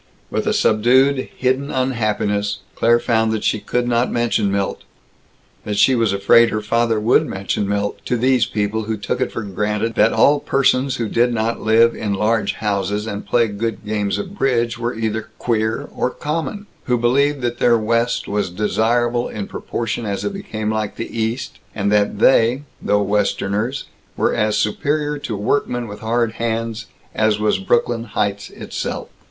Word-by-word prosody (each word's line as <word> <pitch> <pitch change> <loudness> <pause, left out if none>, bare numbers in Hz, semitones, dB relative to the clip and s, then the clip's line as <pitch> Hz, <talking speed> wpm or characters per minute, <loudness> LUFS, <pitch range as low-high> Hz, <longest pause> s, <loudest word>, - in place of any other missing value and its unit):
With - - -1
a - - +3
subdued, 130 +5 +3
hidden 130 +2 0
unhappiness, 105 -5 -1
Claire 120 +1 +3
found 110 -2 +1
that 110 - -2
she 110 - +1
could 120 +4 -1
not 120 +1 +1
mention 115 -4 +1
Milt 100 0 -1 0.8
that 105 -1 -3
she 130 - +5
was 115 -4 +2
afraid 100 +4 +5
her 110 - -1
father 115 0 +1
would 110 +3 +3
mention 100 +1 -2
Milt 100 0 -1
to 125 - 0
these 125 +1 +3
people 105 +1 -2
who 110 0 -2
took 115 +4 -3
it 130 - 0
for 115 - -4
granted 105 +3 -2
that 110 +1 +4
all 145 +1 +4
persons 135 -1 +1
who 115 -3 -2
did 120 +3 +2
not 115 0 -1
live 115 +1 +4
in 105 -2 -2
large 105 0 +1
houses 105 0 -1
and 105 -2 -5
play 120 -1 +3
good 110 +2 -4
games 105 -1 -1
of 200 -1 -5
bridge 120 - +1
were 120 0 -3
either 110 -1 -3
"queer" 110 -1 -1
or - - 0
"common"; 165 +9 -4 0.2
who 125 -1 +2
believed 135 +4 +2
that 120 -1 -2
their 120 -1 +4
West 115 +2 0
was 100 -2 -1
desirable 115 +5 0
in 105 -2 -5
proportion 115 +3 -4
as 100 -2 -3
it 205 - -2
became 110 - -4
like 110 -1 -2
the 115 - -6
East; 115 +3 -3 0.2
and 100 0 0
that 105 0 +2
they, 120 +4 +4 0.2
though 105 0 +2
Westerners, 105 +4 -1 0.3
were - - +1
as 105 0 +1
superior 145 +7 0
to 110 -6 -4
workmen 120 +2 -1
with 105 0 -8
hard 115 0 0
hands 115 -1 -2 0.3
as 110 -1 +2
was 105 -2 +1
Brooklyn 115 +3 0
Heights 100 -2 -2
itself. - - -5
115 Hz, 170 wpm, -20 LUFS, 105-120 Hz, 0.8 s, she